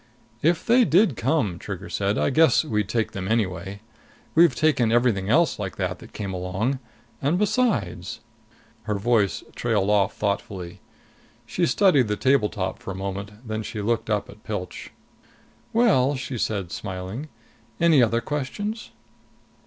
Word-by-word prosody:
"If 165 Hz, +2 st, +2 dB
they 245 Hz, +2 st, +5 dB
did 195 Hz, -, +4 dB
come," 115 Hz, -, 0 dB
Trigger 100 Hz, -1 st, -6 dB
said, 100 Hz, +1 st, -1 dB
"I -, -, +1 dB
guess 160 Hz, +3 st, +4 dB
we'd 105 Hz, -7 st, -1 dB
take 115 Hz, -2 st, 0 dB
them 95 Hz, -1 st, -5 dB
anyway. 100 Hz, -3 st, -1 dB, 0.5 s
We've 165 Hz, -5 st, +5 dB
taken 125 Hz, -6 st, +2 dB
everything 115 Hz, -5 st, +2 dB
else 165 Hz, +2 st, +3 dB
like 95 Hz, -4 st, -4 dB
that -, -, -3 dB
that -, -, -13 dB
came 100 Hz, -2 st, -5 dB
long. 95 Hz, +9 st, -2 dB, 0.4 s
And 145 Hz, +6 st, +2 dB
besides 115 Hz, -, 0 dB, 0.3 s
" -, -, -31 dB
Her 105 Hz, -2 st, -1 dB
voice 105 Hz, -1 st, +1 dB
trailed 100 Hz, +2 st, +1 dB
off 100 Hz, -2 st, +2 dB
thoughtfully. 95 Hz, -3 st, -3 dB, 0.7 s
She -, -, 0 dB
studied 140 Hz, -, +4 dB
the 105 Hz, -, 0 dB
table 130 Hz, -4 st, +3 dB
top 95 Hz, -3 st, -3 dB
for -, -, -9 dB
a 95 Hz, -, -4 dB
moment. 100 Hz, +4 st, -6 dB
Then 110 Hz, 0 st, -2 dB
she 110 Hz, +1 st, -6 dB
looked 115 Hz, +2 st, -1 dB
up 105 Hz, -1 st, 0 dB
at 105 Hz, +1 st, -15 dB
Pilch. 90 Hz, -4 st, -5 dB, 0.8 s
"Well," 185 Hz, -, +3 dB
she 130 Hz, 0 st, -5 dB
said, 100 Hz, -6 st, -2 dB
smiling, 95 Hz, +9 st, -5 dB, 0.5 s
"any 165 Hz, -5 st, +5 dB
other 115 Hz, 0 st, +2 dB
questions?" 180 Hz, -, -4 dB
110 Hz, 155 wpm, -24 LUFS, 100-145 Hz, 0.8 s, they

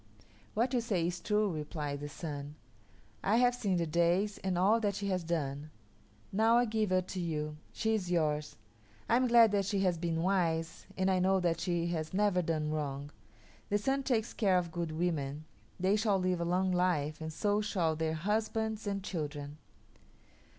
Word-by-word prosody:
"What 240 Hz, +4 st, +1 dB
you 245 Hz, -, +2 dB
say 200 Hz, -8 st, 0 dB
is 175 Hz, +1 st, -2 dB
true," 210 Hz, -1 st, +1 dB
replied 150 Hz, -2 st, -4 dB
the 145 Hz, +1 st, -6 dB
Sun. 145 Hz, -1 st, -6 dB, 0.7 s
"I 205 Hz, -, +3 dB
have 245 Hz, +1 st, +4 dB
seen 200 Hz, -7 st, 0 dB
the 170 Hz, -, +1 dB
days 170 Hz, +6 st, +1 dB
and 190 Hz, -2 st, -1 dB
all 205 Hz, +6 st, +4 dB
that 205 Hz, -3 st, 0 dB
she 200 Hz, 0 st, -3 dB
has 185 Hz, -2 st, 0 dB
done. 150 Hz, -3 st, -2 dB, 0.6 s
Now 225 Hz, +4 st, +4 dB
I 245 Hz, -, +4 dB
give 215 Hz, -2 st, 0 dB
her 185 Hz, 0 st, +2 dB
to 185 Hz, +1 st, -6 dB
you. 150 Hz, -3 st, -3 dB
She 220 Hz, 0 st, 0 dB
is 195 Hz, -5 st, -1 dB
yours. 150 Hz, -3 st, 0 dB, 0.5 s
I 230 Hz, -, +3 dB
am 255 Hz, +1 st, +3 dB
glad 235 Hz, -2 st, +7 dB
that 200 Hz, -1 st, +1 dB
she 200 Hz, 0 st, 0 dB
has 180 Hz, -3 st, +1 dB
been 165 Hz, -1 st, -1 dB
wise, 165 Hz, -4 st, 0 dB
and 190 Hz, 0 st, +2 dB
I 185 Hz, -, +2 dB
know 190 Hz, +1 st, +3 dB
that 170 Hz, -2 st, +1 dB
she 170 Hz, -1 st, 0 dB
has 160 Hz, 0 st, -3 dB
never 200 Hz, -3 st, +3 dB
done 155 Hz, -2 st, -1 dB
wrong. 145 Hz, -2 st, -3 dB, 0.6 s
The 205 Hz, -, +3 dB
Sun 270 Hz, +6 st, 0 dB
takes 235 Hz, -4 st, 0 dB
care 195 Hz, -5 st, +3 dB
of 175 Hz, -2 st, -1 dB
good 170 Hz, -2 st, -3 dB
women; 155 Hz, -3 st, -2 dB, 0.3 s
they 190 Hz, +3 st, +3 dB
shall 210 Hz, -2 st, +2 dB
live 185 Hz, -2 st, 0 dB
a -, -, 0 dB
long 185 Hz, +2 st, +1 dB
time, 180 Hz, -5 st, +1 dB
and 160 Hz, 0 st, -5 dB
so 205 Hz, +6 st, +1 dB
shall 175 Hz, -7 st, 0 dB
their 160 Hz, 0 st, -1 dB
husbands 220 Hz, +4 st, -1 dB
and 200 Hz, -1 st, -2 dB
children. 150 Hz, -5 st, -5 dB
180 Hz, 190 wpm, -32 LUFS, 160-205 Hz, 0.7 s, glad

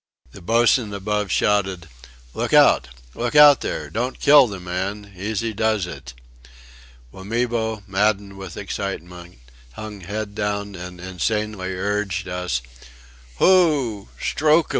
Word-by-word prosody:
The -, -, -13 dB
boatswain 115 Hz, +2 st, +2 dB
above 105 Hz, +1 st, -2 dB
shouted: 95 Hz, -3 st, 0 dB, 0.5 s
"Look -, -, -3 dB
out! 60 Hz, -, +5 dB, 0.3 s
Look 120 Hz, +3 st, -3 dB
out 145 Hz, -2 st, +8 dB
there. -, -, -4 dB
Don't 125 Hz, +3 st, -3 dB
kill 140 Hz, -2 st, +7 dB
the 100 Hz, -3 st, -7 dB
man. 95 Hz, +3 st, -5 dB
Easy 110 Hz, +4 st, -3 dB
does 110 Hz, -2 st, 0 dB
it!" 70 Hz, -8 st, -9 dB, 1.0 s
Wamibo, 110 Hz, +1 st, -2 dB
maddened 100 Hz, 0 st, 0 dB
with 95 Hz, -3 st, -9 dB
excitement, 90 Hz, -4 st, -6 dB, 0.4 s
hung 105 Hz, -, -8 dB
head 100 Hz, +3 st, -5 dB
down 100 Hz, -1 st, -3 dB
and 90 Hz, -1 st, -9 dB
insanely 95 Hz, +1 st, -3 dB
urged 100 Hz, 0 st, -2 dB
us: 90 Hz, -9 st, -2 dB, 0.7 s
"Hoo! 145 Hz, -, +3 dB
Strook'im! 155 Hz, +2 st, +2 dB
100 Hz, 120 wpm, -22 LUFS, 95-110 Hz, 1.0 s, out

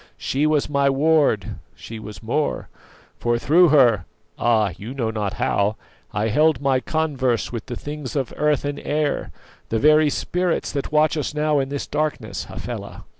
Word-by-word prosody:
She 145 Hz, +3 st, 0 dB
was 155 Hz, -2 st, +2 dB
my 140 Hz, -1 st, +2 dB
ward: 135 Hz, -, +2 dB, 0.2 s
she 115 Hz, -1 st, -9 dB
was 105 Hz, 0 st, -10 dB
more; 145 Hz, +7 st, -1 dB, 0.5 s
for 120 Hz, 0 st, +1 dB
through 165 Hz, +8 st, +5 dB
her 120 Hz, -, +4 dB, 0.3 s
ah! 110 Hz, -4 st, +2 dB
you 115 Hz, +7 st, -8 dB
know 115 Hz, -4 st, -1 dB
not 105 Hz, -2 st, -2 dB
how 105 Hz, 0 st, 0 dB, 0.4 s
I 105 Hz, +3 st, -1 dB
held 150 Hz, +3 st, +3 dB
my 135 Hz, -2 st, +2 dB
converse 135 Hz, -6 st, -1 dB
with 115 Hz, -3 st, -6 dB
the 120 Hz, -, -4 dB
things 145 Hz, 0 st, -6 dB
of 135 Hz, -4 st, -2 dB
earth 150 Hz, -1 st, +1 dB
and 145 Hz, 0 st, -3 dB
air, 150 Hz, -1 st, -1 dB, 0.4 s
the 115 Hz, -, 0 dB
very 150 Hz, +4 st, +5 dB
spirits 180 Hz, +4 st, -1 dB
that 140 Hz, 0 st, -3 dB
watch 155 Hz, +1 st, +3 dB
us 150 Hz, 0 st, -3 dB
now 150 Hz, -1 st, +2 dB
in 135 Hz, 0 st, -1 dB
this 140 Hz, 0 st, -3 dB
darkness, 155 Hz, 0 st, -3 dB
Hafela. -, -, -7 dB
140 Hz, 170 wpm, -22 LUFS, 115-150 Hz, 0.5 s, through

